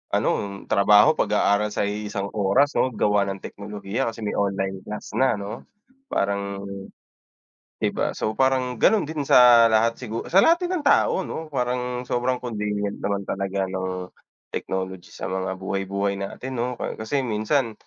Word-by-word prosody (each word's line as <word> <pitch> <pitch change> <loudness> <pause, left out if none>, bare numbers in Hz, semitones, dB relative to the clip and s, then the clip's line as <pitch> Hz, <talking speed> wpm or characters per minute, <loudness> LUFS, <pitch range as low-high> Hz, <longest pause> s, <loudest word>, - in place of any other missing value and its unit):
ano, 100 -1 -1
trabaho, 105 +1 +6
pag-aaral, 100 +1 +2
sa - - -1
iisang 100 -1 -3
oras, 110 +9 +3
'no, - - +3
gawa 105 -1 +2
ng 95 0 -4
teknolohiya 105 +4 -4
kasi 115 - -13
may 105 - -2
online 95 -1 -1
class 105 - -7
na, 130 -2 +3
'no? 100 +1 -6 0.5
Parang 100 0 -1 1.2
di - - +2
ba? - - -2
So, 110 - -2
parang 130 -1 +1
ganun 220 -6 +4
din 150 -3 -3
sa 120 -3 +7
lahat 115 +1 +2
sigu 115 -2 -5
sa 190 +3 +6
lahat 340 +2 +4
din 360 - -2
ng 295 - -6
tao, 190 -8 +3
no, 160 -1 -6
parang 125 -2 -2
sobrang 125 +1 0
convenient 105 -4 -3
naman 100 -1 -2
talaga 95 0 -2
ng 95 -1 -4 0.4
technology 95 -1 -4
sa - - -6
mga 95 0 -2
buhay-buhay 100 +1 -2
natin, 125 +6 -6
'no? 120 - 0
Ka - - -3
kasi 130 +5 -1
minsan, 115 +2 0
105 Hz, 160 wpm, -24 LUFS, 100-125 Hz, 1.2 s, sa